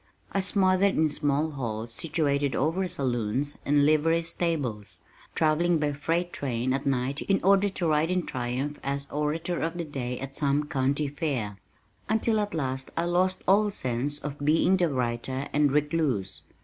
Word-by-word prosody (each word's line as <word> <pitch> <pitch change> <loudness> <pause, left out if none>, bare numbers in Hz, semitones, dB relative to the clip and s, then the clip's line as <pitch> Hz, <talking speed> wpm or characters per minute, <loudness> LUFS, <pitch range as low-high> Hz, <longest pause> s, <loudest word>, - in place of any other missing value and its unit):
I 195 - +1
smothered 190 0 +3
in 155 0 +3
small 145 +2 0
halls 115 -4 -4
situated 145 -3 0
over 165 +7 0
saloons 130 -1 0
and 145 0 +4
livery 160 +2 +3
stables, 120 - -2 0.3
travelling 165 +2 +3
by 150 -1 0
freight 165 +5 -1
train 130 -1 -1
at 135 +1 -2
night 135 +1 0
in 195 - +1
order 200 +1 +4
to 180 -3 -2
ride 155 +1 +2
in 180 -1 0
triumph 130 +4 -3
as 140 +1 -2
"Orator 160 +4 -1
of 165 +2 -2
the 170 - -3
Day" 125 -4 -4
at 135 0 -6
some 145 0 +1
county 140 +2 0
fair, 135 - -3 0.5
until 220 0 +2
at 205 -3 -2
last 130 -3 -2
I 165 - +2
lost 180 +2 +1
all 205 +3 +4
sense 130 -4 -2
of 145 -1 -6
being 160 +5 +4
the 175 -2 +2
writer 130 +1 -2
and 145 -1 +3
recluse. 145 - 0
145 Hz, 160 wpm, -27 LUFS, 130-170 Hz, 0.5 s, and